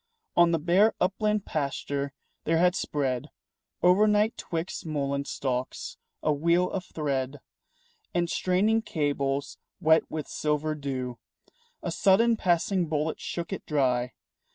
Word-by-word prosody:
On 170 Hz, 0 st, +6 dB
the 170 Hz, -, +2 dB
bare 180 Hz, +7 st, +3 dB
upland 210 Hz, +2 st, +1 dB
pasture 140 Hz, -1 st, -2 dB, 0.3 s
there 165 Hz, +1 st, +2 dB
had 180 Hz, +1 st, +4 dB
spread 135 Hz, -8 st, -2 dB, 0.5 s
O'ernight 210 Hz, +4 st, +4 dB
'twixt 165 Hz, +1 st, -4 dB
mullein 140 Hz, -3 st, -2 dB
stalks 130 Hz, -2 st, -3 dB, 0.3 s
a 155 Hz, -, +3 dB
wheel 170 Hz, +5 st, +2 dB
of 190 Hz, -1 st, -3 dB
thread 140 Hz, -2 st, -2 dB, 0.7 s
And 175 Hz, -1 st, +1 dB
straining 195 Hz, +6 st, +2 dB
cables 140 Hz, -6 st, -1 dB, 0.2 s
wet 160 Hz, 0 st, +4 dB
with 155 Hz, -2 st, -4 dB
silver 150 Hz, 0 st, -1 dB
dew. 130 Hz, -4 st, -4 dB, 0.6 s
A -, -, -2 dB
sudden 225 Hz, +4 st, +4 dB
passing 180 Hz, -2 st, +1 dB
bullet 155 Hz, 0 st, -1 dB
shook 170 Hz, +2 st, -4 dB
it -, -, -5 dB
dry. 125 Hz, -4 st, +1 dB
160 Hz, 125 wpm, -27 LUFS, 140-180 Hz, 0.7 s, On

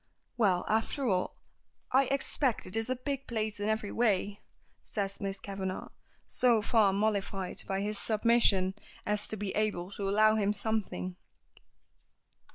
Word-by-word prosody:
"Well, 195 Hz, -7 st, +2 dB
after 225 Hz, +5 st, 0 dB
all, 185 Hz, -4 st, 0 dB, 0.5 s
I 270 Hz, +1 st, +5 dB
expect 270 Hz, -2 st, -1 dB
it 185 Hz, -, -1 dB
is 225 Hz, +1 st, -1 dB
a 255 Hz, -, +1 dB
big 275 Hz, +1 st, -4 dB
place 215 Hz, -3 st, -2 dB
in 205 Hz, +1 st, -1 dB
every 220 Hz, -1 st, -1 dB
way," 205 Hz, -3 st, 0 dB, 0.4 s
says 200 Hz, -2 st, -4 dB
Miss 195 Hz, -1 st, -3 dB
Kavanagh, 190 Hz, -2 st, -5 dB, 0.4 s
so 235 Hz, -4 st, +3 dB
far 215 Hz, -3 st, +4 dB
mollified 195 Hz, -2 st, -1 dB
by 195 Hz, 0 st, -1 dB
his 210 Hz, 0 st, 0 dB
submission 215 Hz, -4 st, +4 dB, 0.3 s
as 210 Hz, 0 st, +1 dB
to 215 Hz, -, -4 dB
be 205 Hz, -1 st, -3 dB
able 205 Hz, -4 st, -1 dB
to 200 Hz, -1 st, -3 dB
allow 215 Hz, +2 st, +5 dB
him 205 Hz, -1 st, +1 dB
something. 200 Hz, -, -2 dB
210 Hz, 145 wpm, -31 LUFS, 195-225 Hz, 0.5 s, I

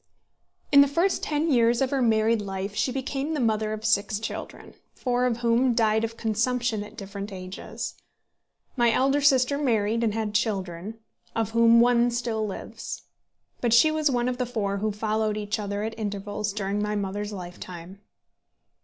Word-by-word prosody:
In 280 Hz, -1 st, +9 dB
the 280 Hz, -, +5 dB
first 340 Hz, +7 st, +1 dB
ten 305 Hz, +2 st, 0 dB
years 235 Hz, -2 st, +4 dB
of 265 Hz, -1 st, +1 dB
her 275 Hz, -2 st, +1 dB
married 220 Hz, -1 st, +3 dB
life 195 Hz, 0 st, -4 dB
she 255 Hz, -, 0 dB
became 270 Hz, +3 st, -2 dB
the -, -, -1 dB
mother 220 Hz, -3 st, +1 dB
of 215 Hz, 0 st, -5 dB
six 210 Hz, -1 st, +2 dB
children, 220 Hz, -, -7 dB, 0.2 s
four 250 Hz, -1 st, 0 dB
of 235 Hz, -2 st, -1 dB
whom 235 Hz, +1 st, +3 dB
died 220 Hz, -1 st, +2 dB
of 230 Hz, 0 st, -3 dB
consumption 230 Hz, 0 st, 0 dB
at 210 Hz, +2 st, -13 dB
different 200 Hz, 0 st, -6 dB
ages. 185 Hz, 0 st, -6 dB, 0.8 s
My 240 Hz, -3 st, +3 dB
elder 270 Hz, +4 st, +2 dB
sister 275 Hz, 0 st, +3 dB
married, 230 Hz, -4 st, +1 dB
and 220 Hz, -2 st, 0 dB
had 220 Hz, -2 st, -2 dB
children, 200 Hz, -2 st, -2 dB, 0.4 s
of 225 Hz, -1 st, -1 dB
whom 230 Hz, 0 st, +6 dB
one 240 Hz, 0 st, +4 dB
still 235 Hz, -2 st, -2 dB
lives; 195 Hz, -, -7 dB, 0.6 s
but 235 Hz, -2 st, +1 dB
she 310 Hz, +7 st, +6 dB
was 310 Hz, -1 st, +1 dB
one 245 Hz, -2 st, 0 dB
of 250 Hz, 0 st, -2 dB
the 250 Hz, -, 0 dB
four 205 Hz, -5 st, -2 dB
who 215 Hz, +2 st, -1 dB
followed 215 Hz, 0 st, -1 dB
each 210 Hz, +1 st, -2 dB
other 205 Hz, 0 st, -3 dB
at 220 Hz, +1 st, -3 dB
intervals 205 Hz, 0 st, -3 dB
during 200 Hz, 0 st, -2 dB
my 210 Hz, 0 st, -1 dB
mother's 205 Hz, +1 st, -3 dB
lifetime. 180 Hz, 0 st, -9 dB
220 Hz, 170 wpm, -26 LUFS, 205-245 Hz, 0.8 s, In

